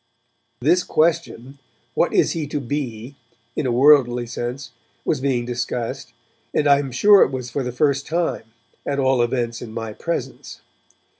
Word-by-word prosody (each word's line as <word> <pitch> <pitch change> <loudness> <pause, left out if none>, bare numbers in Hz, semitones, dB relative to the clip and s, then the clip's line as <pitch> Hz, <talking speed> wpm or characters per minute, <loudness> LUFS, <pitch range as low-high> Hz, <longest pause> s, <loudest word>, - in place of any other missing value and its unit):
This 170 +8 +3
question, 155 -5 -1 0.3
'What - - +1
is - - +3
he 160 -3 -3
to 145 +1 -3
be?' 130 -2 -5 0.4
in 145 - -1
a - - 0
worldly 125 -2 +4
sense, 125 +3 -5 0.3
was - - 0
being 130 -3 0
discussed, 120 -1 -4 0.4
and 150 - +2
I 140 0 +6
am 135 -2 -4
sure 205 +11 +6
that - - +7
it - - -3
was 125 -1 -6
for 140 - -2
the 125 -1 -3
first 140 +2 0
time, 165 -8 -1 0.4
at 140 - -2
all 130 -2 +2
events 120 -1 -1
in 115 - -8
my 115 -1 -5
presence. 170 +9 -5
130 Hz, 165 wpm, -21 LUFS, 120-145 Hz, 0.4 s, that